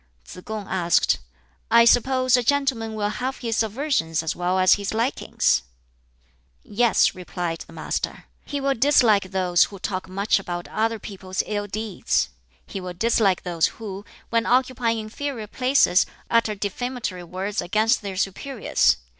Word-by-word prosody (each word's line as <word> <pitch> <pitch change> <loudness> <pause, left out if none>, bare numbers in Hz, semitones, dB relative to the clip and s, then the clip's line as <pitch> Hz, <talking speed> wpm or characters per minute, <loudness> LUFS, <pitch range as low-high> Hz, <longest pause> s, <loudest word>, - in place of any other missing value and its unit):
Tsz - - -10
kung 215 -2 -6
asked, 175 -2 +2 0.5
"I 235 0 +6
suppose 255 +2 +4
a 250 - +3
gentleman 245 -4 0
will 210 -1 0
have 255 +5 -3
his 230 -3 -1
aversions 220 - -1
as 160 - -2
well 180 +1 0
as 185 0 +6
his 200 +1 -2
likings?" 235 +4 +1 1.0
"Yes," 225 +1 +2
replied 175 -2 -4
the - - -14
Master, - - -4 0.2
"he 285 - -4
will 275 0 +1
dislike 230 -7 +4
those 180 -2 +3
who 200 - -10
talk 185 0 -4
much 200 +2 +1
about 175 -2 -5
other 225 +1 0
people's 190 -3 -4
ill 205 -1 -3
deeds. 210 - -1 0.4
He 195 - -6
will 180 -1 -6
dislike 205 -2 +2
those 170 -2 +1
who, 200 -3 -7 0.3
when 230 0 +1
occupying 250 -2 +1
inferior 225 +2 -5
places, 250 -4 +3 0.2
utter 230 -2 +2
defamatory 205 -1 -4
words 190 +4 -3
against 215 +5 +2
their 195 -3 -6
superiors. 195 - +1
210 Hz, 145 wpm, -23 LUFS, 185-235 Hz, 1.0 s, I